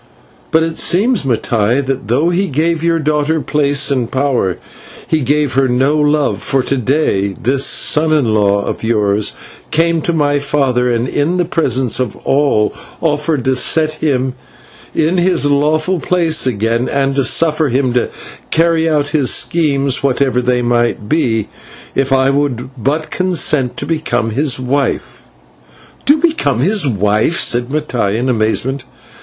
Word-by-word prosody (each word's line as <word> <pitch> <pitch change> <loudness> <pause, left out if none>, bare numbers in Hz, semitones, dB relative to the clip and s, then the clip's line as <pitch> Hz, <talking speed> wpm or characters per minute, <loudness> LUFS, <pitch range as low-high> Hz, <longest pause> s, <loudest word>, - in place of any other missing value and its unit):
But 160 0 +2
it 165 0 -3
seems, 215 +5 +2
Mattai, 120 -2 0
that 135 -5 -3
though 145 +9 +1
he 190 +3 0
gave 165 +2 -1
your 165 0 +2
daughter 155 0 0
place 145 -2 +1
and 125 -4 -1
power, 130 -9 0 0.5
he 160 - +1
gave 145 0 0
her 135 +1 +2
no 130 +4 +1
love, 150 -1 +1
for 135 -2 0
to 140 - -1
day 110 -7 0
this 135 +3 +1
son 155 0 +2
in 135 -8 +2
law 100 -1 +1
of - - -5
yours 105 -2 0 0.4
came 165 +1 +1
to 170 - -1
my 145 -3 +1
father, 135 -3 0
and 120 +1 -1
in 150 +7 -1
the 175 - +1
presence 130 -8 0
of 125 -5 -2
us - - -18
all 135 -7 +1 0.3
offered 150 -3 -1
to 130 0 +2
set 155 +3 +1
him 130 -4 0 0.6
in 165 +4 +1
his 180 -4 +1
lawful 155 +5 +1
place 165 -4 +1
again 115 +1 -1
and 135 -1 0
to 140 - +1
suffer 155 +1 +2
him 130 0 0
to 125 - 0 0.4
carry 165 0 +2
out 145 -2 0
his 145 -4 +1
schemes, 140 -5 0
whatever 130 -2 +1
they 125 0 0
might 120 -3 0
be, 115 -8 0 0.5
if 135 0 -1
I 135 0 +3
would 135 -3 -2
but 145 +6 -2
consent 155 -8 0
to - - -4
become 120 -8 -1
his 135 +2 0
wife." 135 +1 -2 0.8
"To 290 +3 +5
become 300 - 0
his 190 - +2
wife!" 105 - +1
said 120 0 +2
Mattai, 130 -9 -1
in 125 +3 -1
amazement. 125 +3 -1
140 Hz, 160 wpm, -15 LUFS, 125-155 Hz, 0.8 s, To